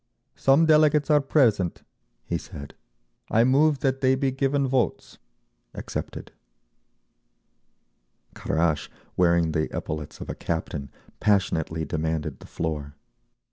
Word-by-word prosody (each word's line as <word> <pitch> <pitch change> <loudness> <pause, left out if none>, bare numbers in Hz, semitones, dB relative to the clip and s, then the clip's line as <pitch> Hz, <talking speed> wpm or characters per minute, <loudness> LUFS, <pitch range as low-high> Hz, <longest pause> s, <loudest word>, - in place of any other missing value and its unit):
"Some 140 +4 +4
delegates 155 -1 +4
are 150 -1 +5
present," 115 - +2 0.4
he - - -2
said. 70 0 -10 0.6
"I 115 - +4
move 140 +3 +3
that 135 -1 0
they 130 0 +4
be 135 0 0
given 135 +1 0
votes." 125 -7 -1 0.6
Accepted. - - -6 2.0
Kharash, 80 -1 -1 0.3
wearing 85 -2 +3
the 80 0 -1
epaulets 75 -1 -5
of - - -7
a - - -3
captain, 75 -4 -4 0.3
passionately 80 -6 +1
demanded 80 0 -3
the - - -13
floor. 75 -3 -4
100 Hz, 110 wpm, -25 LUFS, -, 2.0 s, are